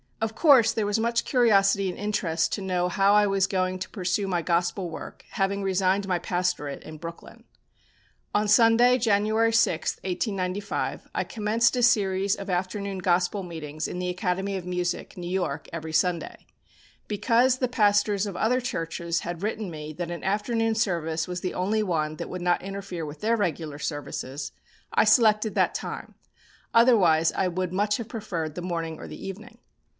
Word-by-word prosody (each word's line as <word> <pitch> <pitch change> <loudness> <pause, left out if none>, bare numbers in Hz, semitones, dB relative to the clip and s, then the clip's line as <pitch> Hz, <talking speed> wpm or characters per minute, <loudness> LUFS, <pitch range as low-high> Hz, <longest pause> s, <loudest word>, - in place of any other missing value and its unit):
Of 225 0 -2
course 260 -8 +6
there 220 -2 -1
was 205 +2 0
much 235 +1 0
curiosity 200 -6 +3
and 180 - -6
interest 190 -6 -1
to 205 - -2
know 180 -2 0
how 195 +2 +3
I 210 0 +5
was 195 -1 +2
going 185 -1 0
to 185 - -5
pursue 185 0 -1
my 175 -3 -1
Gospel 175 +2 0
work, 165 - -9
having 200 +1 0
resigned 195 +1 +1
my 180 -2 +1
pastorate 175 -5 -2
in 155 - -9
Brooklyn. 165 +2 -10 0.9
On 210 +1 +2
Sunday, 230 +4 +5
January 220 0 +2
6, 170 -7 +2
1895, 190 +1 -3
I - - 0
commenced 225 +2 +1
a 245 - 0
series 195 -3 +3
of 200 -1 -8
afternoon 190 +2 -2
Gospel 180 +2 +1
meetings 155 -4 -5
in - - -5
the 180 0 -2
Academy 190 +1 -1
of 185 -2 -5
Music, 180 0 -3
New 175 -1 -5
York, 175 -6 -2
every 160 -1 -5
Sunday. 170 +1 -1 0.6
Because 235 +5 +2
the 255 - 0
pastors 205 -3 +2
of 195 - -6
other 240 +7 +1
churches 170 -6 -2
had 175 +1 -5
written 215 -1 -2
me 155 -1 -7
that 175 +2 -5
an 170 - -6
afternoon 225 +3 0
service 165 -7 -1
was 180 0 -4
the 185 - -3
only 205 +4 0
one 155 -5 -1
that - - -6
would 180 - -5
not 175 0 +2
interfere 195 -4 -5
with 145 0 -9
their 230 +2 +2
regular 160 -6 -2
services, 145 -2 -5 0.4
I - - +5
selected 215 -2 +4
that - - +2
time, - - -6 0.6
otherwise 185 -10 +5
I 190 - +1
would 180 0 -2
much 205 +2 +1
have 230 -1 -6
preferred 175 -9 -4
the 180 - -4
morning 165 -3 -3
or - - -8
the - - -9
evening. 215 +5 -8
190 Hz, 175 wpm, -26 LUFS, 175-215 Hz, 0.9 s, course